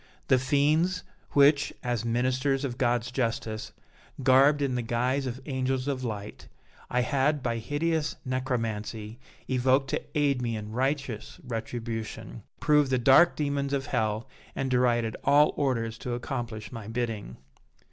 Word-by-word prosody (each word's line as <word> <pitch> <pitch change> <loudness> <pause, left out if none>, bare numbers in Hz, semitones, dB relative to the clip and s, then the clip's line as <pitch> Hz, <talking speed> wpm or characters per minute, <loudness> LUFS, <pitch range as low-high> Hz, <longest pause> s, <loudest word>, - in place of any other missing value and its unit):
The 130 -2 +5
fiends 155 +7 +2 0.3
which, 145 0 +5
as 120 -3 -1
ministers 130 +4 +1
of 125 -1 -5
God's 120 -1 +1
justice, 115 -3 -2 0.5
garbed 140 +3 +5
in 135 -2 0
the 125 - 0
guise 125 +4 0
of 125 0 -4
angels 130 -1 -1
of 135 -2 -2
light, 105 -3 -6 0.4
I 125 - +1
had, 140 +2 +1
by 115 -1 0
hideous 155 +5 -1
necromancy, 115 -4 -3 0.3
evoked 130 +1 +2
to - - 0
aid 140 -3 +2
me 115 -2 -1
in 105 0 -7
righteous 130 -2 -2
retribution, 115 - -5 0.2
proved 150 -2 +3
the 130 - +2
dark 135 +8 +6
demons 140 -1 -1
of 135 -1 0
hell 110 +2 -1 0.3
and 135 -1 -2
derided 120 -3 +2
all 145 +2 +5
orders 115 -5 -1
to 125 - -4
accomplish 120 -3 -5
my 115 -4 -7
bidding. 115 - -3
130 Hz, 140 wpm, -28 LUFS, 115-140 Hz, 0.5 s, dark